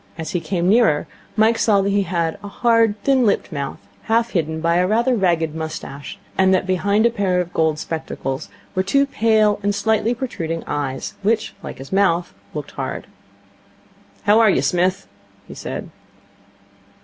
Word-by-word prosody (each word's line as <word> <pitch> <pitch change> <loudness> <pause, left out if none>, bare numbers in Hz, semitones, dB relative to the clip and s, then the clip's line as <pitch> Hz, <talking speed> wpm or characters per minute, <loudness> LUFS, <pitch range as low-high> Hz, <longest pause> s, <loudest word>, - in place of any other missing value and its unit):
As 160 +2 -5
he 180 - 0
came 175 0 -1
nearer 210 -8 +4 0.3
Mike 225 +1 +3
saw 205 -3 +4
that 200 +1 0
he 200 0 +2
had 170 -3 -1
a - - -6
hard, 230 0 +2
thin 270 -2 +3
lipped 205 -3 +1
mouth, 140 -3 -4 0.3
half 230 +1 +1
hidden 160 -3 -1
by 170 +1 +2
a 180 +1 +3
rather 235 +5 +2
ragged 170 -6 +1
moustache, 155 -3 -6 0.2
and 190 0 +5
that 185 - 0
behind 200 +4 +2
a 235 - +4
pair 195 -5 0
of 180 0 -3
gold 160 -1 +1
spectacles 155 -4 -4 0.2
were 185 - +1
two 275 +9 +2
pale 220 -5 +2
and 205 0 0
slightly 220 +3 +1
protruding 165 - -4
eyes, 140 -2 -3
which, 215 +2 0
like - - -7
his 135 +6 -9
mouth, 180 -3 +2 0.2
looked - - -5
hard. - - -5 1.2
'How 215 +1 +5
are 225 -2 +6
you, - - +2
Smith,' 180 +1 +1 0.4
he - - -9
said. - - -6
190 Hz, 170 wpm, -20 LUFS, 165-220 Hz, 1.2 s, are